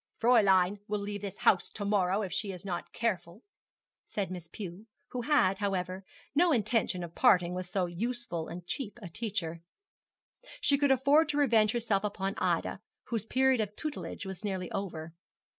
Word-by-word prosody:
'Fräulein 200 -5 +4
will 210 - -1
leave 205 0 -4
this 200 -2 -6
house 180 - +3
to 205 - -6
morrow, 200 0 +2
if 190 - -4
she 205 -3 -1
is 180 0 -9
not 175 -3 -4
careful,' 190 -3 -2 0.6
said 200 -3 -3
Miss 175 -2 -6
Pew, 190 +3 -8 0.2
who 250 - -3
had, 235 -9 +3
however, 190 -2 -2 0.3
no 340 +4 +4
intention 220 - +1
of 170 -1 -7
parting 180 -1 +4
with 180 0 -4
so 185 0 0
useful 180 -2 -3
and 175 +1 -8
cheap 225 +3 -3
a 175 - -6
teacher. 180 -4 -3 1.0
She 280 -1 +3
could 285 -1 +3
afford 280 +4 +4
to 295 - 0
revenge 225 -7 +4
herself 225 -4 +1
upon 195 -1 -2
Ida, 175 0 0 0.3
whose 225 -3 -1
period 260 -1 +3
of 210 -1 -4
tutelage 305 -8 -5
was 190 +2 -6
nearly 190 -3 -3
over. 165 -5 -4
200 Hz, 170 wpm, -31 LUFS, 180-235 Hz, 1.0 s, Fräulein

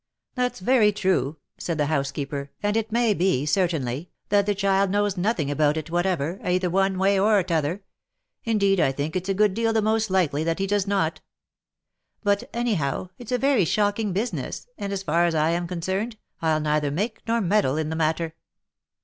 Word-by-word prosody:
M 250 - -2
That's 250 -6 -1
very 220 0 +4
true," 185 -7 0 0.2
said 170 -2 -3
the 150 - +1
housekeeper, 140 -1 -2
" - - -37
and 205 +1 +1
it 225 0 -1
may 235 -1 +3
be, 180 -7 +1
certainly, 155 -3 0 0.2
that 200 0 +3
the 205 - +1
child 195 0 +2
knows 205 0 +1
nothing 180 -6 0
about 150 +1 +2
it 160 +1 -5
whatever, 175 -1 0
either 180 0 0
one 195 +1 +2
way 195 +1 +3
or 205 -1 +4
t'other 165 +3 -1 0.3
— - - -56 0.3
indeed 200 -4 +2
I 135 - +3
think 145 +4 -3
it's 185 +1 -2
a 195 - +1
good 210 -1 +3
deal 225 +2 0
the 220 - +2
most 220 0 +1
likely 160 -6 +1
that 165 0 0
he 195 - 0
does 200 0 0
not; 195 -5 0 0.5
— - - -52
but, 200 -1 +1
any 240 -1 0
how, 155 +2 -2
it's 245 -1 -9
a 250 - +2
very 270 -4 +3
shocking 205 +4 +1
business, 210 +7 -3
and, 200 - -5
as 195 -1 -3
far 170 +1 +2
as 170 -1 0
1 155 +1 +2
am 170 0 -1
concerned, 190 +6 -3 0.2
I'll 160 -1 +2
neither 150 -1 0
make 210 +10 -3
nor 230 +1 +2
meddle 195 -8 +2
in 155 -1 -1
the 160 - -3
matter. 160 +1 0
190 Hz, 205 wpm, -24 LUFS, 160-205 Hz, 0.5 s, very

